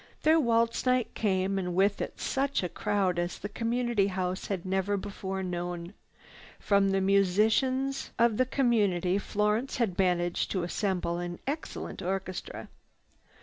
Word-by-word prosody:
Their 320 +1 +5
waltz 230 -2 +1
night 250 -2 +2
came 195 -2 0
and 180 -2 -3
with 200 +2 +2
it - - -5
such 275 -4 0
a 180 - -1
crowd 195 -4 0
as 175 0 -2
the 205 - -5
Community 230 -2 0
House 185 -1 -2
had 190 -3 -3
never 190 +2 0
before 190 -1 -4
known. 175 0 -4 0.7
From 200 -1 +3
the 195 0 +1
musicians 220 +8 +2
of 230 -2 +3
the 255 - +2
community 205 -9 +2
Florence 210 +5 0
had 215 -8 -1
managed 175 -2 +1
to 185 -3 0
assemble 175 -1 -1
an 175 0 -4
excellent 290 -7 -5
orchestra. 185 0 -4
195 Hz, 145 wpm, -29 LUFS, 185-230 Hz, 0.7 s, Their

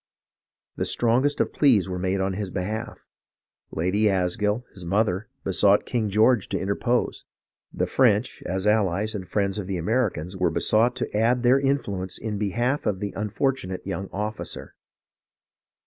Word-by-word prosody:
The - - -1
strongest 125 +5 +2
of - - -1
pleas 120 -10 +4
were 90 -1 -4
made 95 +1 0
in 95 0 0
his 100 0 -3
behalf. 105 +5 -5 0.6
Lady 100 +6 +1
Asgill, 105 +4 0
his 90 - -9
mother, 95 +2 0
besought 100 +1 +3
King 115 -4 -1
George 110 +1 +3
to - - -1
interpose; 120 +5 -1 0.5
the - - -1
French, 120 -2 +2
as 95 +2 -2
allies 105 -1 +2
and 95 -4 -5
friends 100 0 -1
of 95 - -5
the 95 -2 -2
Americans, 95 -3 -1
were 90 -1 +1
besought 115 +3 +2
to 125 - -4
add 120 +3 +2
their 125 +3 +5
influence 100 -10 -1
in 105 -3 -4
behalf 120 +7 0
of 100 -3 0
the 100 -2 -4
unfortunate 105 -2 -2
young 95 0 -4
officer. 105 +2 -5
105 Hz, 150 wpm, -25 LUFS, 95-115 Hz, 0.6 s, their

